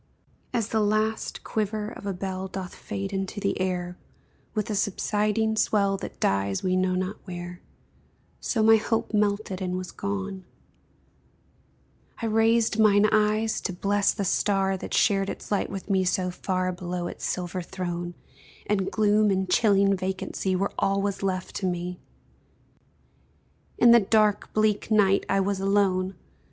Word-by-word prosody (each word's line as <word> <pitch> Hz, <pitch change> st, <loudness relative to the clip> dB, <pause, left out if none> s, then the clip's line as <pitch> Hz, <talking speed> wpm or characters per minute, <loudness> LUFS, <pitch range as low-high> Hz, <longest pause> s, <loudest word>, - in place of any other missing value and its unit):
As 230 Hz, -4 st, -1 dB
the 220 Hz, -, +1 dB
last 215 Hz, +1 st, 0 dB
quiver 215 Hz, 0 st, -2 dB
of 200 Hz, -, -9 dB
a 200 Hz, -, -1 dB
bell 190 Hz, +1 st, -4 dB
Doth 185 Hz, -1 st, -6 dB
fade 195 Hz, 0 st, -5 dB
into 195 Hz, +2 st, -3 dB
the 200 Hz, -2 st, -1 dB
air, 180 Hz, -1 st, -2 dB, 0.6 s
With 215 Hz, 0 st, -1 dB
a -, -, -1 dB
subsiding 210 Hz, +2 st, 0 dB
swell 200 Hz, -2 st, +2 dB
That 195 Hz, -, -7 dB
dies 100 Hz, 0 st, 0 dB
we 185 Hz, 0 st, +1 dB
know 185 Hz, 0 st, +1 dB
not 185 Hz, +3 st, -2 dB
where, 175 Hz, -1 st, -7 dB, 0.8 s
So 220 Hz, -3 st, 0 dB
my 225 Hz, 0 st, +7 dB
hope 225 Hz, +1 st, -1 dB
melted 205 Hz, -2 st, 0 dB
and 180 Hz, -1 st, -2 dB
was 185 Hz, -1 st, -6 dB
gone: 195 Hz, -1 st, -4 dB, 1.8 s
I 230 Hz, -, -3 dB
raised 225 Hz, 0 st, +2 dB
mine 210 Hz, -1 st, +5 dB
eyes 215 Hz, +1 st, +2 dB
to 185 Hz, -, -3 dB
bless 200 Hz, +2 st, +1 dB
the 200 Hz, -, -3 dB
star 195 Hz, 0 st, +1 dB
That 185 Hz, -, -4 dB
shared 195 Hz, -2 st, +3 dB
its -, -, -7 dB
light 205 Hz, -, 0 dB
with 195 Hz, -1 st, -6 dB
me 190 Hz, -2 st, +2 dB
so 180 Hz, 0 st, 0 dB
far 185 Hz, 0 st, -1 dB
Below 180 Hz, 0 st, -4 dB
its -, -, -7 dB
silver 180 Hz, 0 st, -2 dB
throne, 175 Hz, -1 st, -5 dB, 0.5 s
And 195 Hz, -2 st, 0 dB
gloom 215 Hz, 0 st, +3 dB
and 190 Hz, -1 st, 0 dB
chilling 200 Hz, -1 st, +4 dB
vacancy 190 Hz, 0 st, -2 dB
Were 195 Hz, +2 st, 0 dB
all 195 Hz, 0 st, +1 dB
was 200 Hz, -1 st, -2 dB
left 185 Hz, -1 st, -2 dB
to 190 Hz, -, -1 dB
me, 180 Hz, 0 st, -3 dB, 1.8 s
In 235 Hz, -, +7 dB
the 235 Hz, -, +8 dB
dark, 210 Hz, 0 st, +2 dB
bleak 215 Hz, -1 st, +1 dB
night 200 Hz, -3 st, +3 dB
I 195 Hz, 0 st, +3 dB
was 195 Hz, 0 st, -1 dB
alone! 195 Hz, -1 st, +1 dB
195 Hz, 155 wpm, -26 LUFS, 185-210 Hz, 1.8 s, the